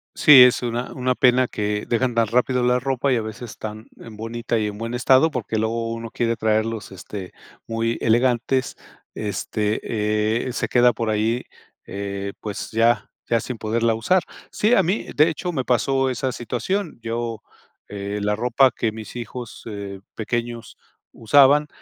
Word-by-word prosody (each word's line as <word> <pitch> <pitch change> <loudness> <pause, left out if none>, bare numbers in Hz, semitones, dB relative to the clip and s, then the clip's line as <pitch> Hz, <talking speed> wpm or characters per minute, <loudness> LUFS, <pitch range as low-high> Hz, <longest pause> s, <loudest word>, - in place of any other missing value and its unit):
Sí, 140 -4 +9
es 125 0 +4
una 120 +1 -3
una 130 -1 0
pena 125 0 +4
que 105 -1 -2
dejan 120 +1 0
tan 115 -1 +3
rápido 125 +2 +1
la 125 0 +3
ropa, 135 +1 0
y - - +2
a - - -1
veces 110 +2 -8
tan 110 +1 -7
en 110 -2 -11
bonita, 115 +1 -3
y 110 -1 0
en 105 0 -6
buen 115 +2 -5
estado, 130 +5 +4
porque 120 -6 -3
luego 115 +1 -1
uno 115 0 -6
quiere 115 -1 0
traerlos, 110 -1 -1
este, 95 0 -8 0.3
muy 115 0 -1
elegantes. 120 +2 +1 0.4
Este, 105 0 -2 0.7
eh, 125 - -4
se - - -1
queda 120 0 +4
por 115 0 -2
ahí, 110 +3 0 0.4
eh, 100 0 -5
pues, 105 -2 -6
ya 115 -1 +2 0.2
ya 115 -1 +2
sin 125 +1 -5
poderla 115 +1 0
usar. 170 +12 +2 0.3
Sí, 215 +3 +2
a - - +6
mí, 185 +6 -1
de 150 +2 +5
hecho, 175 +2 -3
me 135 -6 -2
pasó 135 +2 +1
esa 130 +1 -2
situación. 140 - -3
Yo 115 -1 -3 0.5
eh, 100 0 -4
la 105 +1 +1
ropa 125 +3 +3
que 115 -1 -1
mis 110 +2 -8
hijos, 120 0 -7
eh, 100 -3 -6 0.2
pequeños 120 +1 -4 0.3
usaban, 145 +5 +4
115 Hz, 170 wpm, -22 LUFS, 110-125 Hz, 0.7 s, Sí